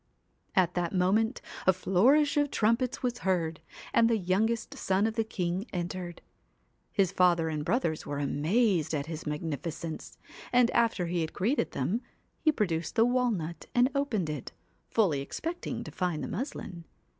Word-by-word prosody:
At 180 -2 +3
that 175 +1 -1
moment 210 +6 +2 0.3
a 190 - +7
flourish 240 +12 +3
of 290 -1 +2
trumpets 230 +4 +1
was 245 -1 -1
heard, 170 -6 0 0.3
and 230 - +5
the 230 - +3
youngest 220 +7 0
son 195 -5 +1
of 225 - 0
the 225 0 +1
king 190 -1 -2
entered. 175 -1 -4 0.7
His 195 -4 +2
father 175 -4 +3
and 155 -1 -2
brothers 165 - 0
were 145 - -4
amazed 160 - +1
at 140 -1 -2
his 160 0 -6
magnifi 150 +1 -3
cence, 160 0 -7 0.3
and 245 -1 +4
after 230 -6 +2
he 170 0 -1
had 160 - -3
greeted 240 +10 0
them 190 - -1 0.4
he 310 - +4
produced 175 - -1
the 225 - +5
walnut 235 -10 0
and 245 +2 +4
opened 220 - 0
it, 145 -5 -6 0.4
fully 175 -11 +2
expecting 330 - -4
to - - -8
find 180 -4 -2
the - - -3
muslin. 185 - -5
185 Hz, 160 wpm, -29 LUFS, 165-230 Hz, 0.7 s, a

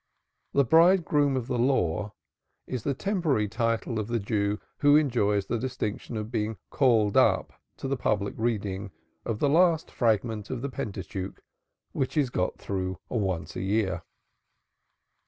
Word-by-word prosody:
The 140 - +4
Bridegroom 160 -2 +4
of 125 - -2
the 125 -1 -2
Law 105 -6 +1 0.5
is 125 -3 -4
the 140 +4 -1
temporary 160 - 0
title 115 +1 -1
of 105 - -3
the 120 0 0
Jew 105 -1 -1 0.2
who 145 0 +6
enjoys 110 -9 +2
the 120 - -2
distinction 120 -2 -3
of 105 +1 -5
being 110 -2 -1
"called 115 -7 +3
up" - - +3 0.2
to - - -4
the 135 - 0
public 105 -5 0
reading 105 -4 -2 0.4
of 110 - -2
the 145 - +2
last 165 +2 +3
fragment 110 -2 0
of 130 -1 -4
the 140 - -2
Pentateuch, 100 -7 -5 0.5
which 135 +3 -2
is 135 -5 +2
got 90 -6 -1
through 95 -2 -3
once 95 -8 -2
a - - -3
year. 95 -2 0
115 Hz, 150 wpm, -27 LUFS, 100-135 Hz, 0.5 s, who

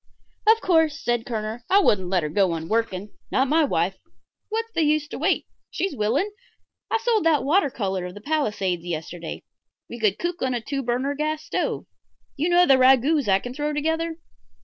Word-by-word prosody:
"Of 450 +1 +6
course," 320 -4 +2
said 240 -6 -1
Kerner, 220 0 -4
"I 390 - +5
wouldn't 190 - +2
let 180 -3 +1
her 150 - -2
go 185 +2 +2
on 165 0 -4
working. 210 -2 -1 0.2
Not 265 - +2
my 315 +4 +3
wife. 190 - 0 0.5
What's 455 +1 -3
the 335 - 0
use 305 -1 +2
to - - -6
wait? 345 +6 +1 0.2
She's 385 -7 -2
willing. 250 - 0 0.6
I - - +2
sold 455 -3 +1
that 305 -6 +3
water 305 +3 +3
color 190 -6 -3
of 180 - -10
the - - -8
Palisades 210 - -1
yesterday. 170 0 -6 0.4
We 235 - -8
could 210 -3 +2
cook 345 0 -3
on 260 -1 0
a - - -1
two 275 +4 -3
burner 255 +3 -1
gas 305 +1 -2
stove. - - -2 0.5
You 310 +5 0
know 350 +1 +5
the 270 -4 +5
ragouts 265 +2 +4
I 190 -1 +5
can 245 +5 -7
throw 295 +2 -2
together? 320 +2 -1
265 Hz, 195 wpm, -24 LUFS, 210-320 Hz, 0.6 s, Of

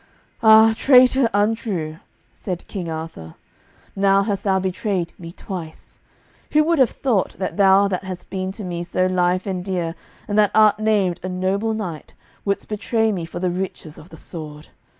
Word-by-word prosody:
"Ah, 220 0 +7
traitor, 255 -1 +5
untrue," 205 -7 -1 0.4
said 180 -3 -6
King 180 -5 -5
Arthur, 160 - -7 0.6
"now 195 0 +3
hast 200 -1 -2
thou 195 -3 +2
betrayed 185 -1 -2
me 165 -1 -8
twice. 170 -4 -9 0.5
Who 305 0 +5
would 330 0 +1
have 260 -4 +5
thought 230 -8 -1
that 185 - -3
thou 195 0 +5
that 190 -1 -3
hast 185 -1 -8
been 190 -1 -3
to 210 - -8
me 175 -2 -4
so 180 +1 0
lief 185 0 +1
and 185 -3 -3
dear, 175 -3 -2 0.3
and 210 0 +1
that 210 -1 +5
art 215 -1 +5
named 205 -5 +1
a 185 - -4
noble 195 +4 -1
knight, 180 -8 -6 0.3
wouldest 200 -1 -2
betray 220 +1 0
me 180 -5 -3
for 165 - -9
the 180 0 0
riches 180 -4 -5
of 160 - -15
the 160 - -12
sword. 150 -2 -9
190 Hz, 170 wpm, -21 LUFS, 175-215 Hz, 0.6 s, Ah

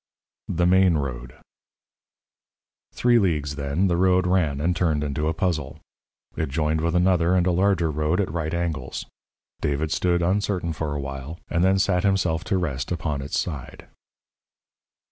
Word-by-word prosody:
THE 85 +1 0
MAIN 90 -2 +4
ROAD 60 -3 -5 1.6
_Three 120 -1 +4
leagues, 75 -6 0
then, 70 +6 -1
the 85 -2 +1
road 90 0 +3
ran, 90 -6 +1
and 85 +4 +1
turned 80 -4 +1
into 75 +1 -2
a 80 - +1
puzzle. 80 -6 -2 0.6
It - - -2
joined 80 +2 0
with 85 +1 0
another 90 0 +3
and 90 -1 +2
a 90 - +2
larger 90 -3 +2
road 75 +4 0
at 95 -6 0
right 80 -1 -2
angles. 85 -6 -3 0.6
David 75 +2 -1
stood, 85 +1 +1
uncertain, 90 -2 0
for 75 -1 -3
a - - -2
while, 70 +3 -6
and 85 0 +1
then 95 +1 +4
sat 95 -2 +2
himself 95 -5 +1
to 95 - 0
rest 70 -7 -3
upon 75 -5 -2
its 70 - -2
side. 75 -7 -6
85 Hz, 160 wpm, -24 LUFS, 75-90 Hz, 1.6 s, MAIN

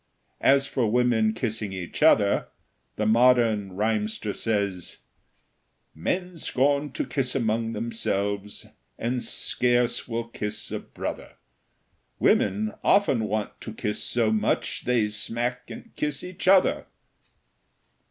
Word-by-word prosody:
As 135 0 +4
for 125 -5 0
women 115 -2 +3
kissing 110 -3 -3
each 90 -2 -6
other, 105 -10 +4 0.5
the 105 - -1
modern 115 -3 +3
rhymster 105 +1 -1
says: 100 -5 -2 1.0
Men 180 - -3
scorn 140 0 +1
to - - -2
kiss 135 -2 -2
among 115 -2 0
themselves, 105 -2 -2 0.3
And 125 +1 -2
scarce 120 0 +1
will 115 -1 -3
kiss 105 -2 -5
a - - -2
brother; - - -6 0.8
Women 105 +2 +2
often 140 - +3
want 105 0 -3
to 110 - -7
kiss 105 -1 -2
so 115 -3 +1
much, 110 -1 0
They 120 -3 +2
smack 120 +4 -3
and - - -11
kiss 150 -2 -2
each 180 0 -7
other. 190 0 +4
115 Hz, 115 wpm, -26 LUFS, 105-125 Hz, 1.0 s, As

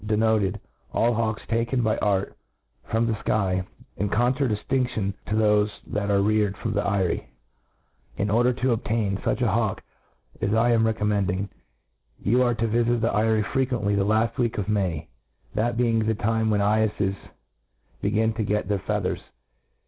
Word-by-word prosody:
denoted 110 -2 +2 0.3
all 120 +1 +2
hawks 110 -1 -1
taken 115 +2 0
by 110 -1 +2
art 100 -2 0 0.5
from 115 +1 +1
the 115 - 0
Iky, 95 -3 0 0.3
in 100 +2 -1
contradiftindion 120 -2 0
to - - -2
thofe 105 -1 +3 0.2
that 100 0 -2
are 100 -1 +3
reared, 105 -1 +1
from 115 - -3
the 105 - +1
eyrie. 100 -3 0 0.4
' - - -36
^ - - -19
In 100 0 0
order 120 +3 +4
to 130 +1 0
obtain 110 -3 0
fuch 125 - -1
a 120 -5 +2
hawk 110 -1 0 0.6
as 100 +2 +1
I 115 +2 +3
am 115 -1 +3
recom 110 -1 0
mending, 100 -1 0 0.7
you 120 +5 +2
are 120 -2 +2
to 115 +1 0
vifit 120 +1 +1
the 115 - +1
eyrie 110 0 +2
frequently 125 -4 0
the 100 -1 +2
laft 110 +3 +1
week 120 -2 0
of 105 - -2
May, 90 -6 -1 0.5
that 115 +2 0
being 115 -2 +2
the 110 0 +1
time 110 +1 0
when 105 -1 +2
cyeffes 105 -1 +1 0.9
begin 110 +2 +1
to 110 0 -2
get 105 -2 -1
their 100 -1 0
feathers. 100 -1 -2
110 Hz, 170 wpm, -25 LUFS, 100-115 Hz, 0.9 s, order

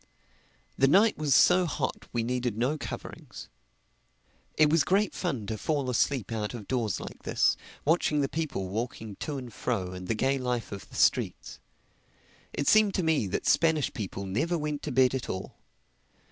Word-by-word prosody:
The 135 - +5
night 205 +9 +5
was 145 -4 +3
so 180 0 +5
hot 130 -2 -3
we 120 -1 -1
needed 125 -2 -2
no 125 +6 +1
coverings. 155 - -8 1.1
It 155 - +6
was 155 +1 +3
great 200 +3 +2
fun 135 - -3
to 110 0 -4
fall 140 0 -1
asleep 125 -2 0
out 110 +1 -3
of 105 -4 -8
doors 115 -7 -1
like - - -9
this, - - +2 0.3
watching 150 -1 +2
the 140 - +1
people 150 -11 -3
walking 110 0 -4
to 150 -2 -4
and 125 -4 -8
fro 100 -6 -2
and 90 0 -7
the 115 - 0
gay 135 +4 +1
life 125 -2 -2
of 100 -1 -8
the - - -13
streets. - - +1 0.9
It 140 - -3
seemed 215 -2 +5
to 185 - 0
me 160 -10 +2
that 95 - -3
Spanish 160 -4 +2
people 100 -2 -5
never 160 - 0
went 150 -2 -3
to - - -4
bed 130 -1 +4
at 130 -3 -3
all. 95 - -6
130 Hz, 175 wpm, -28 LUFS, 110-155 Hz, 1.1 s, It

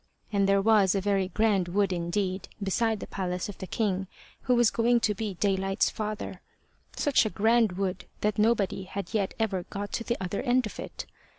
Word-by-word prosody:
And 200 -1 +3
there 195 0 +3
was 205 -3 +4
a - - +2
very 195 -1 +1
grand 200 -1 +1
wood 195 +1 +1
indeed 185 +2 -2 0.2
beside 220 +2 +1
the - - -4
palace 180 0 -3
of 200 - -9
the 190 - -6
king 195 -3 -1 0.4
who 250 - +3
was 240 -2 +4
going 235 +1 +3
to 210 - +2
be 205 -1 -4
Daylight's 195 +1 +1
father; 215 -1 -5 0.5
such 290 -2 +3
a 215 - -1
grand 220 -1 +3
wood, 185 -1 -3 0.2
that 210 0 0
nobody 210 -4 +1
yet 200 -3 -3
had 200 -3 0
ever 215 -5 0
got 205 0 -5
to 230 - -1
the 235 +1 -1
other 190 +1 -2
end 255 -1 +2
of 215 - -8
it. - - -6
200 Hz, 195 wpm, -28 LUFS, 190-220 Hz, 0.5 s, was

